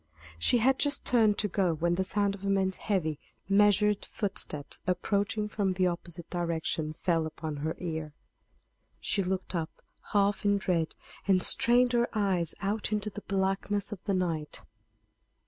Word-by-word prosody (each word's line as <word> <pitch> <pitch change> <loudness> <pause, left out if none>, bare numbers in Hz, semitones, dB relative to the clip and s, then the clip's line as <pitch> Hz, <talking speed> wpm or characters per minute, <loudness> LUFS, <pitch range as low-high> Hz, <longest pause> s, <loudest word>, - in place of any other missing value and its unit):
She 165 - +4
had 260 +3 +3
just 290 -1 +2
turned 220 -4 +4
to 210 - 0
go 185 -4 0
when 170 +2 0
the 185 +2 0
sound 200 +1 +1
of 200 -1 -10
a 200 - -1
man's 190 -1 +1
heavy, 160 -8 -1 0.3
measured 205 +1 +3
footsteps, 150 -8 -3
approaching 200 +3 0
from 200 -3 -1
the 185 0 +1
opposite 175 -1 -4
direction, 165 -3 -2
fell 165 -1 0
upon 155 -1 -6
her 155 +3 -3
ear. 160 -4 -5 0.8
She 200 - 0
looked 190 0 -3
up 165 -2 -2 0.4
half 200 0 +2
in 205 0 +3
dread, 170 -4 -1 0.3
and 185 -2 +4
strained 245 +1 +5
her 240 0 +2
eyes 190 -6 0
out 205 +2 -2
into 210 0 -2
the 210 - -8
blackness 195 +1 -1
of 200 -3 -7
the 200 - 0
night. 165 -5 -3
190 Hz, 160 wpm, -29 LUFS, 170-205 Hz, 0.8 s, strained